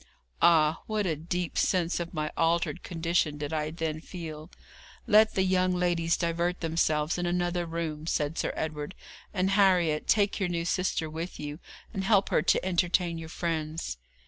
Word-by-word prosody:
Ah! 160 -2 +4
what 215 -2 0
a 165 -4 0
deep 170 +2 -3
sense 180 -2 +1
of 170 0 -4
my 155 -2 -2
altered 170 +2 +1
condition 165 -3 0
did 145 +1 -4
I 155 -1 -1
then 160 -1 -3
feel! 160 -3 -8 0.6
'Let 215 +1 +5
the 190 - +3
young 185 -1 +2
ladies 175 -2 +1
divert 170 +1 -1
themselves 160 -1 +1
in 175 - -1
another 175 0 0
room,' 160 -2 -4
said 150 -1 0
Sir - - -1
Edward; 155 +2 -4 0.4
'and 185 +1 0
Harriet, 180 -6 +3
take 205 -1 +2
your 190 -3 0
new 170 -1 -2
sister 180 -2 0
with 160 +3 -6
you, 150 +1 -5 0.3
and 195 -3 -2
help 200 -1 +3
her - - +3
to - - +2
entertain 175 -2 +1
your 160 -1 -8
friends.' 160 - -3
170 Hz, 170 wpm, -28 LUFS, 155-180 Hz, 0.6 s, Let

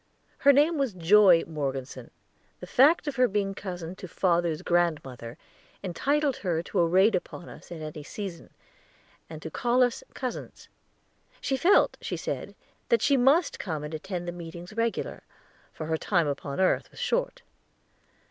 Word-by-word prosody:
Her 280 - +7
name 295 +3 +3
was 270 -6 0
Joy 185 0 +6
Morgeson; 135 -4 -5 0.5
the - - -8
fact 295 +7 +4
of 290 -3 -4
her 250 0 +5
being 200 -1 -1
cousin 180 -3 -6
to 185 - -8
father's 170 -2 0
grandmother 145 -9 -1 0.5
entitled 275 - 0
her 170 -4 -1
to 190 - -2
a 170 - +4
raid 190 +6 +4
upon 175 0 -4
us - - -13
at 165 -2 -7
any 155 0 -7
season, 180 +2 -7 0.8
and 155 -1 -9
to 160 - -6
call 245 +6 +2
us 245 -1 -1
"cousins." 255 -2 -6 0.7
She 270 - -1
felt, 345 +9 +4
she - - -4
said, - - -5 0.3
that 470 - +3
she 280 - +4
must 275 +7 +3
come 160 -6 -4
and 150 +1 -6
attend 175 +2 -5
the - - -2
meetings 175 +2 -9
regular, 230 +1 -2 0.5
for 155 - -7
her 160 0 -1
time 170 -1 +1
upon 140 0 -4
earth 190 - +2
was - - -14
short. - - -1
180 Hz, 160 wpm, -27 LUFS, 165-245 Hz, 0.8 s, Her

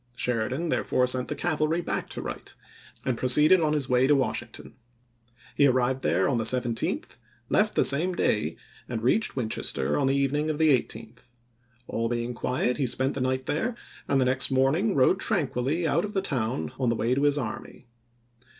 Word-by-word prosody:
Sheridan 125 +7 -1
therefore 125 - +1
sent 125 0 0
the - - -3
cavalry 155 0 0
back 175 - -3
to - - -6
Wright, - - -7 0.5
and 125 -3 -1
proceeded 150 +8 +5
on 155 -1 +1
his 145 -4 -1
way 125 0 +3
to 145 - +4
Washington. 120 -4 -3 0.8
He 140 - +5
arrived 130 0 +1
there 90 -3 +1
on 125 -4 0
the - - -1
17th, 125 0 +2 0.3
oct.,i864. - - -18 0.3
left - - +2
the - - +3
same 170 +6 +3
day, 85 - 0 0.3
and 115 -3 -4
reached 210 - +1
Winchester 110 - -1
on 135 - +1
the 135 - +2
evening 145 +3 0
of 155 - -2
the 160 0 +3
18th. 115 -1 -7 0.6
All 115 0 -2
being 120 0 -2
quiet 125 +1 -1
he 140 -3 0
spent 130 +3 -1
the 135 - -4
night 130 0 -1
there, 225 - -2 0.3
and 140 - +2
the 130 - +2
next 130 +1 +1
morning 135 +11 +1
rode 140 +8 +3
tranquilly 150 - -1
out 170 - +1
of 210 - -5
the 195 - 0
town 110 - -2
on 125 -3 +1
the 115 - +1
way 115 +2 0
to 135 - 0
his 145 0 +3
army. 120 -1 -6
130 Hz, 190 wpm, -26 LUFS, 120-150 Hz, 0.8 s, proceeded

